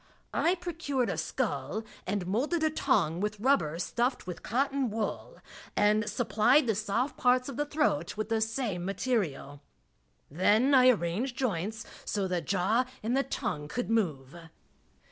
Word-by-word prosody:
I 345 +3 +2
procured 325 -8 -2
a - - -2
skull 220 - -2 0.2
and 195 -1 -1
molded 275 - 0
a 315 - +2
tongue 165 - +1
with 210 0 -2
rubber 205 - +2
stuffed 240 +8 -1
with 180 -2 -6
cotton 270 +2 0
wool, 220 - -4 0.4
and 210 +1 +3
supplied 240 +5 +3
the 225 - +2
soft 220 +6 -1
parts 250 0 +3
of 275 - -6
the 295 +1 -1
throat 250 - 0
with 215 +1 -3
the 225 -1 +1
same 220 -5 -1
material 185 - -2 0.7
Then 210 - +3
I 255 -1 +7
arranged 230 +4 0
joints, 220 -2 -2 0.2
so 200 -2 -1
the 180 -2 -1
jaw 200 - +1 0.2
and 235 +4 0
the 270 - +3
tongue 150 - -3
could 235 +8 -3
move. 155 - -1
220 Hz, 150 wpm, -29 LUFS, 185-260 Hz, 0.7 s, I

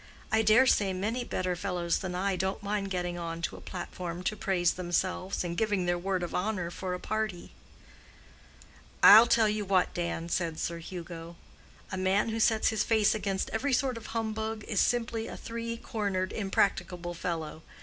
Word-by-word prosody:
I 220 +1 +4
dare 220 +4 +6
say 200 -6 +3
many 215 +7 -2
better 185 -5 -2
fellows 175 -2 -1
than 180 -2 -4
I 195 +1 0
don't 190 +2 -2
mind 200 -1 -2
getting 175 -2 -2
on 165 -1 -4
to - - -2
a - - -11
platform 175 -1 -6
to 215 - -1
praise 180 -4 +1
themselves, 185 +1 -1
and 170 -1 -3
giving 205 -3 +1
their 175 0 +2
word 185 0 -1
of 175 - -4
honor 180 -3 -1
for 180 0 -4
a - - -6
party." 215 -4 -3 1.5
"I'll 220 +4 +10
tell 225 -2 +4
you 210 0 -1
what, 190 -2 +2
Dan," 170 -1 -3
said 170 -2 -1
Sir 170 0 -2
Hugo, 170 -1 -8 0.6
"a 190 - -3
man 190 +4 +2
who 225 0 -2
sets 220 -1 +3
his 220 - 0
face 215 -2 +3
against 195 -3 -2
every 265 +5 0
sort 255 0 +1
of 230 - -8
humbug 220 -1 -3
is 205 - 0
simply 230 -2 0
a - - -7
three 230 0 -5
cornered, 200 -5 -2
impracticable 190 -3 0
fellow. 165 -2 -4
190 Hz, 180 wpm, -29 LUFS, 175-220 Hz, 1.5 s, I'll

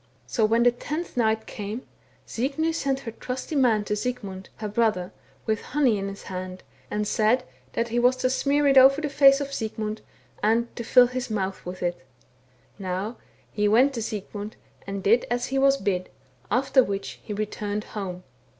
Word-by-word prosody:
So 225 - +1
when 230 +2 +3
the 245 - +6
tenth 305 +7 -5
night 220 -2 +1
came, 210 +4 -6 0.4
Signy 285 +7 -1
sent 275 -4 -1
her 230 - -6
trusty 255 +6 -5
man 235 -6 +3
to 210 - -1
Sigmund, 210 -5 -4
her 215 - -5
brother, 210 -4 0 0.3
with 220 -1 0
honey 255 -7 +1
in 195 - -3
his 195 0 -7
hand, 185 0 -6 0.3
and 210 0 -1
said 220 +4 +2 0.3
that 235 0 -1
he 240 +2 +1
was 250 +1 +4
to 255 0 0
smear 285 +2 +2
it 275 -1 +7
over 270 +2 +7
the 305 -1 -2
face 275 -1 +6
of 280 -1 -4
Sigmund, 215 -2 -3 0.4
and 230 +3 +1
to 235 - -4
fill 245 +2 +6
his 250 0 -4
mouth 195 -3 -2
with 180 0 -6
it. 175 -6 -2 0.8
Now 195 +4 -3 0.3
he 210 -1 +1
went 250 +7 +5
to 235 - -3
Sigmund, 210 0 -5 0.3
and 195 -1 -4
did 230 +4 +3
as 245 0 0
he 270 +1 -1
was 275 0 +5
bid, 185 -7 -1 0.4
after 260 +1 +4
which 195 -2 -4
he - - -9
returned 210 0 -3
home. 185 -5 -6
225 Hz, 180 wpm, -25 LUFS, 205-255 Hz, 0.8 s, it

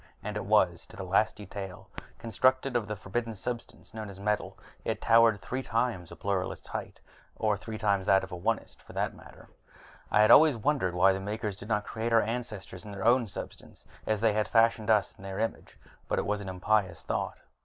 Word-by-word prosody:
And 105 +1 -4
it 105 - -3
was, 95 -5 +2
to - - -14
the 95 - -5
last 100 +4 +2
detail. 100 -2 -8 0.3
Constructed 130 +3 +1
of 115 -3 +1
the 105 - -3
forbidden 110 +3 -3
substance 115 +2 -6
known 110 -2 -6
as 95 -1 -10
metal, 105 +1 -1 0.3
it - - -2
towered 115 -2 +5
three 130 +7 -4
times 115 -8 -1
a - - -8
Pluralist's 95 -2 -3
height, - - -6 0.4
or 110 -1 +1
three 110 +2 -7
times 100 -3 +1
an 95 - +6
Onist's, 95 +4 -3
for - - -14
that - - -1
matter. - - -15 0.6
I 105 - +4
have 110 - +6
always 155 -4 +8
wondered 115 -8 0
why 95 +2 +5
the 95 - -3
Makers 105 +1 -3
did 100 +2 -11
not 105 -2 +1
create 115 +1 -3
our 115 - +6
ancestors 110 -5 -5
in 105 - -9
their 100 0 -5
own 120 0 +4
substance, - - -9 0.2
as 110 -1 0
they 110 -2 +4
had 105 0 +1
fashioned 115 -1 +3
us 105 -2 +3
in - - -15
their 95 0 -5
image. 115 0 -3 0.3
But - - 0
that - - -1
is 105 0 -1
an 95 - -6
impious 95 -1 0
thought. - - -3
105 Hz, 205 wpm, -29 LUFS, 95-115 Hz, 0.6 s, always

